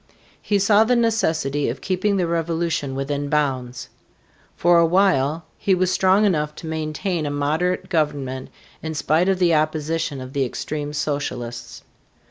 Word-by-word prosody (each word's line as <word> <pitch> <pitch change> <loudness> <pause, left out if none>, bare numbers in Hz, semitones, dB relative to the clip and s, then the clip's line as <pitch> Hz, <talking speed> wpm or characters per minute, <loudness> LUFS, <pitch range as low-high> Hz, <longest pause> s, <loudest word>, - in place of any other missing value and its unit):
He 205 - +1
saw 205 +2 +5
the 245 +3 +2
necessity 160 - +1
of 125 +3 -4
keeping 195 +4 0
the 180 - +1
revolution 165 -4 -1
within 140 +1 -2
bounds. 130 -5 -1 0.7
For 175 0 +4
a 170 - +5
while 165 -4 +2
he 195 - +2
was 185 0 +1
strong 190 +3 +3
enough 150 -6 0
to - - -10
maintain 160 +1 -2
a - - -1
moderate 155 +6 -1
government 145 -7 -2 0.3
in 160 0 -5
spite 160 +5 +2
of 190 - +2
the 175 -2 +3
opposition 155 -1 -1
of 130 +1 -8
the 140 -2 +1
extreme 145 +3 -4
socialists. 125 -6 -4
155 Hz, 150 wpm, -22 LUFS, 145-180 Hz, 0.7 s, saw